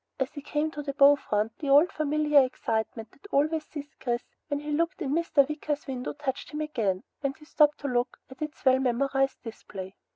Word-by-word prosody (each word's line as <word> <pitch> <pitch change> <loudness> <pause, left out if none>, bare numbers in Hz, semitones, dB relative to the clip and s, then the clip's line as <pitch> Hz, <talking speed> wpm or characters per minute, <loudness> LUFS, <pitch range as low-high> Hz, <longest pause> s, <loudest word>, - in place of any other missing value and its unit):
As 265 0 -1
he 290 - -8
came 300 +2 -1
to 295 - -5
the 280 -1 -5
bow 285 +1 +8
front 215 -4 -1
the 290 - -3
old 290 +6 +6
familiar 300 -1 +3
excitement 225 -3 -3
that 410 - -16
always 310 0 +1
seized 290 0 -9
Chris 240 -1 -1 0.2
when 285 -2 -1
he 295 +1 -5
looked 335 +4 0
in 285 -7 -2
Mr. 310 -4 +3
Wicker's 300 -1 -3
window 255 -2 -4
touched 285 -3 -4
him 300 0 -4
again, 220 -11 -1 0.2
and 275 -1 -2
he 300 - -16
stopped 300 -1 +4
to 285 - -2
look 245 -1 0
at 260 +2 -14
its 305 -1 -6
well 260 0 +6
memorized 270 +2 0
display. 195 -4 -8
280 Hz, 205 wpm, -28 LUFS, 255-300 Hz, 0.2 s, bow